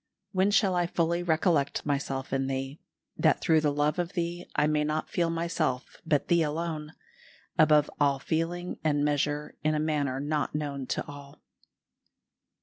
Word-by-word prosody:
"When 190 +1 +2
shall 200 -2 +3
I 175 -1 +1
fully 170 0 0
recollect 160 -4 +1
myself 135 -2 -2
in 135 0 0
Thee, 135 +2 -3 0.4
that - - +3
through 160 -1 +3
the 150 -1 +2
love 145 +3 0
of 175 +2 -2
Thee 175 0 -3
I 150 - +3
may 150 0 +2
not 155 +1 -2
feel 170 -1 +1
myself 165 -6 -2
but 150 -3 +2
Thee 170 -1 +4
alone, 155 0 -2 0.7
above 150 -2 +6
all 140 -2 +3
feeling 165 +5 -2
and 145 -2 +2
measure 145 0 -1
in 155 0 +2
a - - +1
manner 145 -4 0
not 150 +1 -1
known 140 -3 -3
to - - -2
all?" 145 0 -12
150 Hz, 160 wpm, -28 LUFS, 145-170 Hz, 0.7 s, above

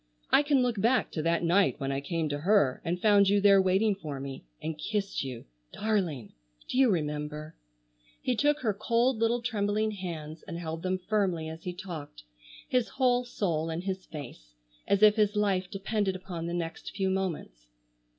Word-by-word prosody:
I - - +7
can 285 -3 +3
look 235 -5 0
back 245 +3 +2
to 155 - -2
that 165 +2 +1
night 180 +2 +3
when 135 -1 -2
I 135 0 -1
came 165 +1 -2
to 145 0 -2
her 170 -6 +3
and 175 +2 -1
found 200 -1 +5
you 205 0 +4
there 200 -1 +6
waiting 190 +3 +3
for 155 -8 -6
me, 135 0 -7 0.2
and 160 0 -4
kissed 200 +4 -2
you,—darling. 130 - -3 0.3
Do 255 - -1
you 265 -2 +6
remember?" 150 -2 -2 0.7
He 250 - 0
took 295 +4 +2
her 220 -5 +1
cold 230 +4 +1
little 230 +1 +1
trembling 215 -2 0
hands 165 -5 -6
and 170 -3 -5
held 165 -1 -5
them 185 +1 0
firmly 185 -4 0
as 160 +1 -9
he 180 - -3
talked, 160 - -8 0.4
his 250 -2 +1
whole 250 -2 +2
soul 165 -9 -1
in 165 +1 -3
his 190 0 -4
face, 120 - -10 0.3
as 200 +1 +3
if 215 +1 +7
his 210 -1 +2
life 195 -3 +1
depended 195 -1 -1
upon 180 -3 -6
the 170 - -3
next 165 +1 -5
few 190 -1 0
moments. 165 - -3
185 Hz, 180 wpm, -29 LUFS, 160-210 Hz, 0.7 s, I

